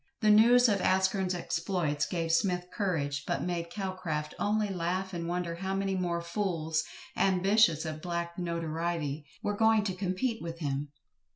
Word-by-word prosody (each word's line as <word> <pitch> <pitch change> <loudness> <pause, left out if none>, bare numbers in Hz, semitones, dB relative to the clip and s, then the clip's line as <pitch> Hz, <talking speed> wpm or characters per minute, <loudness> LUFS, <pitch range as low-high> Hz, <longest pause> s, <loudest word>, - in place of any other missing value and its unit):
The 215 -1 +5
news 240 +4 +7
of 200 -4 +1
ASKERN'S 190 0 +2
exploits 170 -4 -1
gave 165 0 -1
SMITH 180 +1 +1
courage, 145 -9 -1
but - - -1
made 170 -1 -2
CALCRAFT 180 -7 -3
only 210 0 +1
laugh 185 +1 -2
and 170 -1 -3
wonder 175 -1 -2
how 190 +2 -2
many 195 0 0
more 175 -2 -1
fools, 170 -3 -1 0.3
ambitious 190 -3 +3
of 155 -1 -4
a - - -12
black 170 +1 -4
notoriety, 165 -3 -2 0.2
were 205 - 0
going 220 0 +4
to 195 -2 -1
compete 190 +6 -2
with 165 0 -5
him. 145 -2 -2
180 Hz, 160 wpm, -30 LUFS, 165-195 Hz, 0.3 s, news